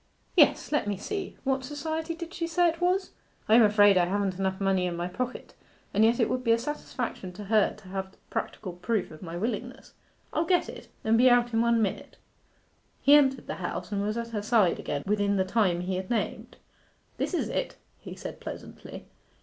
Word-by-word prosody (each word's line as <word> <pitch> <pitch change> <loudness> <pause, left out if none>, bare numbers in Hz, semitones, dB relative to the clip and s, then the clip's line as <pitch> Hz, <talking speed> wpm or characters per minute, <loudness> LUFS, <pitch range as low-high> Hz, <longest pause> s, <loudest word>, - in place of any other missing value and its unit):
'Yes; - - +4
let 295 -8 +1
me 205 -1 -1
see 395 - -5
what 265 -1 0
Society 315 +4 -3
did 335 +1 -8
she 335 -3 -2
say 350 +1 +3
it 330 +1 -6
was? 370 +2 +1 0.4
I 215 - +3
am 235 - +8
afraid 205 -3 +6
I 175 - +4
haven't 195 -1 -1
enough 190 -1 -1
money 190 -2 +1
in 175 - -3
my 175 +1 -2
pocket, 250 +7 -5 0.4
and 210 - +4
yet 230 +2 +4
it 230 - +3
would 255 0 -2
be 230 -2 +4
a - - +3
satisfaction 245 -7 -4
to 205 - -8
her 215 +1 +2
to - - -16
have 190 0 -5
practical 185 -4 -4
proof 200 +4 -2
of 155 - -12
my 170 -1 -6
willingness. 225 +7 -4 0.4
I'll 320 +2 +1
get 360 0 +2
it, - - -10 0.2
and 225 +1 +3
be 255 +1 +7
out 240 -1 +3
in 225 - +3
one 235 -1 +3
minute.' 200 - -4 0.8
He 285 - +5
entered 270 -2 +5
the - - -5
house - - -4
and 200 -1 -1
was 210 +2 -1
at 235 0 -3
her 215 -3 -3
side 210 -4 +3
again 145 -1 -3
within 205 0 +1
the 190 -1 +1
time 185 -4 +1
he 185 +1 -2
had 185 0 -5
named. 235 - -3 0.6
'This - - -1
is - - -1
it,' - - -3 0.2
he - - -9
said - - -8
pleasantly. - - -9
220 Hz, 210 wpm, -28 LUFS, 190-265 Hz, 0.8 s, am